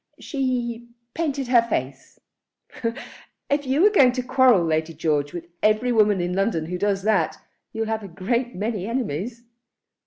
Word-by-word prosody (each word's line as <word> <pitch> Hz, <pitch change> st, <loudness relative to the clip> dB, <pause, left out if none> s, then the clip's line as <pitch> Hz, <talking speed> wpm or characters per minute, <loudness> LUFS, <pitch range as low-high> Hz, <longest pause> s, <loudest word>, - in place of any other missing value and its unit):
"She 240 Hz, -4 st, -3 dB, 0.2 s
painted 285 Hz, -5 st, -2 dB
her 245 Hz, -2 st, +6 dB
face." 135 Hz, -, -4 dB, 1.3 s
"If 285 Hz, -1 st, 0 dB
you're 315 Hz, +11 st, +4 dB
going 265 Hz, -, +5 dB
to 255 Hz, -1 st, -2 dB
quarrel, 250 Hz, -6 st, +4 dB
Lady 160 Hz, 0 st, -1 dB
George, 145 Hz, -2 st, 0 dB
with 175 Hz, -1 st, -7 dB, 0.2 s
every 215 Hz, +4 st, +2 dB
woman 210 Hz, -4 st, +3 dB
in 175 Hz, +1 st, -2 dB
London 195 Hz, -4 st, 0 dB
who 180 Hz, +2 st, -4 dB
does 200 Hz, -1 st, 0 dB
that, 200 Hz, -7 st, +1 dB, 0.3 s
you'll 225 Hz, 0 st, -2 dB
have 220 Hz, 0 st, -2 dB
a 200 Hz, -, -8 dB
great 235 Hz, +8 st, -2 dB
many 205 Hz, 0 st, -3 dB
enemies." 230 Hz, -, -3 dB
220 Hz, 150 wpm, -23 LUFS, 180-250 Hz, 1.3 s, her